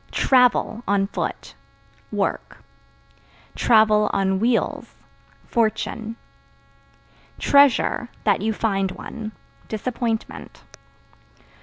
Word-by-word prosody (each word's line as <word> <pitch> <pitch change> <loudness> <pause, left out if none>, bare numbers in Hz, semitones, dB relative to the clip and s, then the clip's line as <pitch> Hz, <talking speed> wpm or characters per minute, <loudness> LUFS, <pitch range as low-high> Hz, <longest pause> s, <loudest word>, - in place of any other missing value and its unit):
Travel 250 -3 +2
(On 200 -1 +2
foot) 195 - -5 0.6
work; - - -3 1.1
(on 210 -4 +3
wheels) 235 +3 -1 0.5
fortune. 225 0 -1 1.2
Treasure 280 -3 +3
(That 205 -2 +2
you 220 +2 0
find 195 -3 -1
one) 220 -2 -8 0.4
disappointment. 225 0 -4
220 Hz, 65 wpm, -22 LUFS, 205-235 Hz, 1.2 s, on